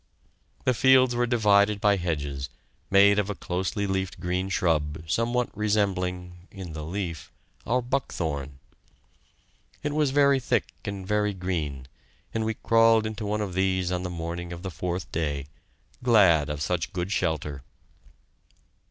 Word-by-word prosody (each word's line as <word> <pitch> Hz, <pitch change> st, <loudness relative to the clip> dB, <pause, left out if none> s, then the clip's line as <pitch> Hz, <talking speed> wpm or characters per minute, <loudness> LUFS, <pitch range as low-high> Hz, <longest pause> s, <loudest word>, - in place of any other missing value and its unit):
The 130 Hz, -, +4 dB
fields 130 Hz, 0 st, +5 dB
were 120 Hz, 0 st, +1 dB
divided 105 Hz, -3 st, +3 dB
by 100 Hz, -1 st, +3 dB
hedges, 75 Hz, -6 st, -3 dB, 0.4 s
made 100 Hz, +1 st, +6 dB
of 105 Hz, 0 st, -1 dB
a 105 Hz, -, -2 dB
closely 95 Hz, +4 st, -2 dB
leaved 95 Hz, -1 st, -2 dB
green 90 Hz, +1 st, -2 dB
shrub, 80 Hz, -4 st, 0 dB
somewhat 120 Hz, +8 st, 0 dB
resembling 90 Hz, -4 st, -1 dB
in 95 Hz, -5 st, -8 dB
the 75 Hz, -1 st, -6 dB
leaf 85 Hz, -1 st, -5 dB, 0.4 s
our 125 Hz, +2 st, +1 dB
buckthorn. 80 Hz, -, -3 dB, 1.3 s
It 145 Hz, 0 st, -1 dB
was 150 Hz, -2 st, +2 dB
very 140 Hz, 0 st, +4 dB
thick 125 Hz, -, -1 dB
and 100 Hz, -2 st, -5 dB
very 105 Hz, -1 st, +1 dB
green, 80 Hz, -8 st, -3 dB, 0.5 s
and 110 Hz, -, 0 dB
we 110 Hz, 0 st, -1 dB
crawled 115 Hz, -1 st, +4 dB
into 110 Hz, -1 st, -4 dB
one 105 Hz, +1 st, -1 dB
of 100 Hz, -3 st, -3 dB
these 95 Hz, -1 st, +1 dB
on 90 Hz, 0 st, -1 dB
the 90 Hz, -, -4 dB
morning 85 Hz, 0 st, -5 dB
of 85 Hz, +1 st, -7 dB
the 95 Hz, -, -4 dB
fourth 90 Hz, +2 st, -4 dB
day, 75 Hz, -4 st, -2 dB, 0.6 s
glad 95 Hz, -, +5 dB
of 75 Hz, 0 st, -3 dB
such 90 Hz, 0 st, -1 dB
a -, -, -28 dB
good 90 Hz, +1 st, -3 dB
shelter. 75 Hz, -7 st, -1 dB
95 Hz, 150 wpm, -26 LUFS, 85-105 Hz, 1.3 s, made